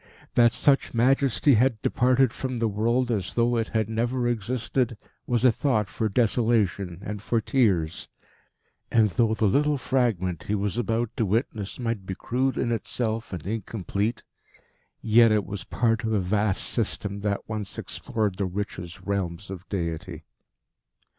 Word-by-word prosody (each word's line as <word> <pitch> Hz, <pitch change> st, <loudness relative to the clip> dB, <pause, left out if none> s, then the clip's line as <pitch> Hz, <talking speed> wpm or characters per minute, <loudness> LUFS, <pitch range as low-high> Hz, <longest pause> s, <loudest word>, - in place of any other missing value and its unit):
That 120 Hz, -1 st, +5 dB
such 140 Hz, -1 st, +2 dB
majesty 135 Hz, +3 st, +3 dB
had 120 Hz, 0 st, +3 dB
departed 130 Hz, 0 st, +3 dB
from 130 Hz, -2 st, -4 dB
the 115 Hz, 0 st, +1 dB
world 115 Hz, +4 st, +1 dB
as 100 Hz, -5 st, -2 dB
though 120 Hz, 0 st, +2 dB
it 110 Hz, -1 st, 0 dB
never 120 Hz, +3 st, -1 dB
had 120 Hz, -, +3 dB
existed, 120 Hz, +1 st, -1 dB, 0.3 s
was 120 Hz, 0 st, +1 dB
a 125 Hz, -, +7 dB
thought 110 Hz, -4 st, 0 dB
for 110 Hz, +1 st, -1 dB
desolation 105 Hz, -5 st, +1 dB
and 105 Hz, -1 st, -5 dB
for 115 Hz, +2 st, 0 dB
tears. 100 Hz, -10 st, +1 dB, 0.8 s
And 110 Hz, -3 st, +3 dB
though 110 Hz, +5 st, +2 dB
the 110 Hz, -, +1 dB
little 145 Hz, +8 st, +2 dB
fragment 110 Hz, -11 st, 0 dB
he 105 Hz, -, 0 dB
was 100 Hz, 0 st, -1 dB
about 115 Hz, -1 st, -1 dB
to 115 Hz, -, +1 dB
witness 105 Hz, -1 st, -2 dB
might 115 Hz, -6 st, -3 dB
be 95 Hz, -, -3 dB
crude 130 Hz, +6 st, -1 dB
in 120 Hz, -, 0 dB
itself 115 Hz, 0 st, -2 dB
and 85 Hz, -5 st, -6 dB
incomplete, 105 Hz, +1 st, -2 dB, 0.8 s
yet 115 Hz, 0 st, +6 dB
it 105 Hz, -2 st, +2 dB
was 100 Hz, -1 st, -6 dB
part 115 Hz, 0 st, 0 dB
of 110 Hz, 0 st, -1 dB
a 105 Hz, -, +2 dB
vast 100 Hz, +1 st, 0 dB
system 100 Hz, 0 st, -2 dB
that 100 Hz, 0 st, -2 dB
once 105 Hz, -3 st, -5 dB
explored 105 Hz, -4 st, -3 dB
the 100 Hz, -, 0 dB
richest 90 Hz, -1 st, -5 dB
realms 95 Hz, -1 st, -3 dB
of 95 Hz, -1 st, -9 dB
deity. 85 Hz, -5 st, -4 dB
110 Hz, 155 wpm, -26 LUFS, 100-120 Hz, 0.8 s, a